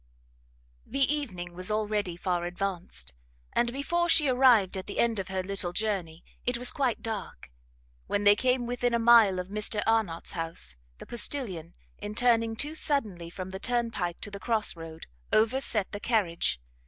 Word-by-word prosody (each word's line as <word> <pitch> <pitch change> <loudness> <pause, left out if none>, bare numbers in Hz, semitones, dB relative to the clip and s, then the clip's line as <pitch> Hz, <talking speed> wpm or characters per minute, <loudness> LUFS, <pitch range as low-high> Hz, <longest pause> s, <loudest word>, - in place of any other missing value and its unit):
The 275 +3 +1
evening 180 -12 -6
was 185 +2 -1
already 210 -4 -1
far 175 -1 -1
advanced, 175 - -4 0.4
and 240 - +1
before 345 +6 -1
she 320 -3 +5
arrived 250 -7 +4
at 190 - -6
the 200 - -6
end 230 -3 +2
of 190 - -4
her 190 -1 -3
little 185 -2 -3
journey 180 -6 -1 0.2
it 245 0 0
was 245 +1 +4
quite 260 -5 -1
dark. 205 - -6 0.6
When 205 - 0
they 205 0 +7
came 250 +2 +1
within 245 0 -1
a - - +3
mile 230 -5 +6
of 180 0 -5
Mr 210 0 +2
Arnott's 220 -7 0
house, 165 - -2 0.2
the - - -11
postilion, 200 - +1 0.2
in 205 +1 -6
turning 230 -2 +2
too 295 +7 -2
suddenly 215 - -1
from 185 +2 -7
the 190 - -6
turnpike 230 -8 -2
to 205 - -6
the 200 - -7
cross 220 -2 0
road, 165 -1 -9 0.3
overset 220 -2 +2
the 205 - -5
carriage. 185 - 0
210 Hz, 165 wpm, -28 LUFS, 180-240 Hz, 0.6 s, they